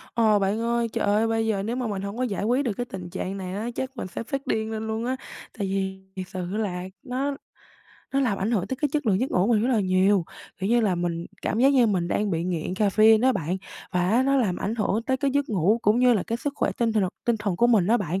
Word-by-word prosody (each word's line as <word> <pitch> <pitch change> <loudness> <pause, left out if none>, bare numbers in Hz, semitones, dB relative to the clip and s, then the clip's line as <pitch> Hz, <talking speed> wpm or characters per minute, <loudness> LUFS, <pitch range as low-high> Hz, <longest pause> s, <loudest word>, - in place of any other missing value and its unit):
Ờ, 220 -3 +4
bạn 200 +3 0
ơi, 235 0 0
trời - - 0
ơi 210 +2 +2
bây 225 0 0
giờ 200 -3 0
nếu 230 +4 -2
mà 250 -2 -2
mình 200 -3 -3
hông 200 +2 -5
có 255 - 0
giải 205 -5 -2
quyết 250 +6 +1
được 230 - 0
cái 245 - -2
tình 180 -6 -7
trạng 190 +1 -4
này 185 -1 -5
á, 215 +4 -3
chắc 265 0 -4
mình - - -4
sẽ 185 - -6
phát 275 +3 -4
điên 220 0 -1
lên 220 0 -4
luôn 220 +1 -2
á, 255 +1 0 0.4
tại 200 -3 -2
vì 190 0 -2
thiệt 185 -1 -5
sự 185 -1 -5
là 180 -5 -2 0.2
nó 270 +3 -2 0.8
nó 275 - +3
làm 230 -7 +1
ảnh 200 +4 -1
hưởng 205 -7 0
tới 260 - -3
cái 295 +3 0
chất 295 -4 -1
lượng 195 -2 +3
giấc 260 - -1
ngủ 180 +1 +2
mình 220 -2 +3
rất 240 - +1
là 225 - +3
nhiều. 185 0 +3 0.3
Kiểu 195 - -2
như 240 0 +4
là, 205 -5 +2
mình 170 -1 -2 0.2
cảm 220 - -1
giác 260 +3 +6
như 255 -4 +5
mình 180 -5 0
đang 205 +3 0
bị 165 -1 -1
nghiện 175 -1 -2
caffeine 215 +2 +4
đó 260 +2 +4
bạn 180 -3 -2 0.4
và 180 0 +1
á 235 +4 +4
nó 275 +1 +2
làm 205 -9 +1
ảnh 210 - -2
hưởng 220 -1 0
tới 260 +3 0
cái 280 +1 0
giấc 285 +1 0
ngủ 205 +2 +2
cũng 210 +3 +3
như 250 0 +5
là 200 - +1
cái 230 - -3
sức 290 - -3
khỏe - - +1
tinh 230 -2 +1
thần 205 -4 +2 0.2
tinh 235 -1 +3
thần 205 -4 -2
của 240 - +4
mình 220 -7 +4
đó 230 +4 +4
bạn. 185 -3 -2
215 Hz, 285 wpm, -25 LUFS, 190-240 Hz, 0.8 s, giác